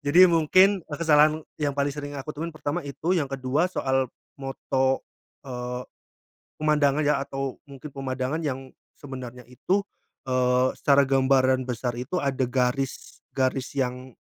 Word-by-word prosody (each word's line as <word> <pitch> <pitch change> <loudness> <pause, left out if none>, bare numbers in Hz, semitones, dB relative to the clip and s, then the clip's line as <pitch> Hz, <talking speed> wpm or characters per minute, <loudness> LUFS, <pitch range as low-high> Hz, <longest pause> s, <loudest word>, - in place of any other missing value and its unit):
Jadi 170 +6 +7
mungkin 170 +3 +5 0.2
kesalahan 155 0 +4 0.2
yang 145 -1 +1
paling 140 0 +1
sering 145 0 -6
aku 140 +3 -5
temuin, 165 +2 -4
pertama 155 +2 -3
itu. 150 +5 -2
Yang 140 -4 -1
kedua 140 +7 +1
soal 130 -4 +1 0.3
foto, 135 0 0 0.4
eee, 125 -1 -5 0.8
pemandangan 150 -1 +3
ya, 150 0 +3
atau 135 -1 -4
mungkin 140 +1 -10
pemandangan 135 +3 -2
yang 135 -2 -3 0.3
sebenarnya 130 -3 -8
itu, 185 +10 0 0.5
eee, 125 0 +3
secara 140 -1 +4
gambaran 130 -1 +3
besar 125 0 -2
itu 130 +9 -3
ada 135 -2 0
garis, 125 +1 -2 0.2
garis 130 0 0
yang 125 -2 -3
135 Hz, 135 wpm, -26 LUFS, 130-150 Hz, 0.8 s, Jadi